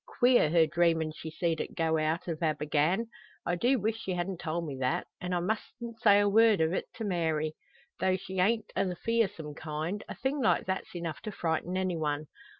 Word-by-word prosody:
Queer, 245 Hz, -10 st, +4 dB
her 165 Hz, 0 st, +5 dB
dreamin' 160 Hz, 0 st, +2 dB
she 160 Hz, -, -7 dB
seed 165 Hz, 0 st, -1 dB
it -, -, -6 dB
go 160 Hz, -1 st, +2 dB
out 155 Hz, +3 st, -1 dB
o' 165 Hz, -, -1 dB
Abergann! 155 Hz, +6 st, +1 dB, 0.4 s
I 175 Hz, -, 0 dB
do 245 Hz, +10 st, +3 dB
weesh 220 Hz, +1 st, -1 dB
she 190 Hz, -4 st, -3 dB
hadn't 180 Hz, 0 st, -3 dB
told 165 Hz, +1 st, -2 dB
me 145 Hz, -3 st, -5 dB
that; 130 Hz, -1 st, 0 dB, 0.2 s
an' 180 Hz, -, -3 dB
I 180 Hz, -, +1 dB
mustn't 225 Hz, +4 st, -4 dB
say 205 Hz, -3 st, +6 dB
word 215 Hz, +1 st, +5 dB
o't 160 Hz, +3 st, +1 dB
to 225 Hz, -, -5 dB
Mary. 160 Hz, -5 st, 0 dB, 0.5 s
Tho' 185 Hz, 0 st, +2 dB
she 190 Hz, 0 st, -6 dB
ain't 220 Hz, +3 st, +1 dB
o' -, -, +2 dB
the 180 Hz, -, -3 dB
fearsome 190 Hz, -8 st, -1 dB
kind, 160 Hz, +7 st, -4 dB
a -, -, -5 dB
thing 270 Hz, +3 st, -1 dB
like 225 Hz, -, +3 dB
that's 190 Hz, -1 st, -3 dB
enough 170 Hz, -2 st, -4 dB
to 215 Hz, -, -5 dB
frighten 175 Hz, 0 st, -1 dB
anyone. 160 Hz, -5 st, -1 dB
175 Hz, 195 wpm, -30 LUFS, 160-205 Hz, 0.5 s, say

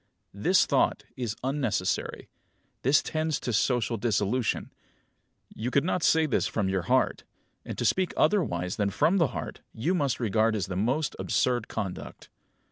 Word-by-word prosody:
"This -, -, +3 dB
thought -, -, +1 dB
is 120 Hz, -4 st, -3 dB
unnecessary. 125 Hz, -9 st, -1 dB, 0.5 s
This 135 Hz, +3 st, +4 dB
tends 155 Hz, -1 st, -1 dB
to 120 Hz, -, -2 dB
social 120 Hz, +1 st, +1 dB
dissolution. 110 Hz, +2 st, 0 dB, 0.8 s
You 115 Hz, +3 st, -3 dB
could 140 Hz, +2 st, +2 dB
not 180 Hz, +1 st, 0 dB
say 160 Hz, 0 st, +4 dB
this 150 Hz, -, +1 dB
from 105 Hz, -4 st, -1 dB
your 95 Hz, -1 st, 0 dB
heart; -, -, +2 dB, 0.4 s
and -, -, -7 dB
to -, -, -1 dB
speak 185 Hz, -1 st, +2 dB
otherwise 90 Hz, -, +1 dB
than 100 Hz, -1 st, +1 dB
from 175 Hz, -, +2 dB
the 165 Hz, -5 st, +4 dB
heart -, -, -6 dB
you 155 Hz, +12 st, 0 dB
must 145 Hz, -9 st, 0 dB
regard 110 Hz, -1 st, +2 dB
as 100 Hz, -5 st, -1 dB
the 95 Hz, -, -5 dB
most 130 Hz, +10 st, 0 dB
absurd 120 Hz, -3 st, 0 dB
conduct." 100 Hz, -5 st, -6 dB
120 Hz, 155 wpm, -27 LUFS, 105-150 Hz, 0.8 s, This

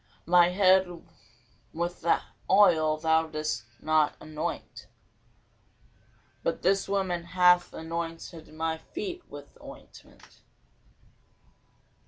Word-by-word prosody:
My 175 Hz, 0 st, +5 dB
head 185 Hz, 0 st, +4 dB, 0.9 s
with 170 Hz, +1 st, -4 dB, 0.5 s
oil 165 Hz, -6 st, +4 dB
thou 160 Hz, +1 st, +2 dB
didst 155 Hz, -7 st, -3 dB
not 155 Hz, -1 st, +2 dB
anoint: 155 Hz, 0 st, -6 dB, 1.5 s
but -, -, -2 dB
this 195 Hz, +1 st, +1 dB
woman 190 Hz, -3 st, -1 dB
hath 180 Hz, 0 st, +4 dB
anointed 165 Hz, 0 st, -6 dB
my 160 Hz, +1 st, -3 dB
feet 365 Hz, -, -6 dB
with 145 Hz, 0 st, -12 dB
ointment. -, -, -15 dB
170 Hz, 85 wpm, -28 LUFS, 155-185 Hz, 1.5 s, My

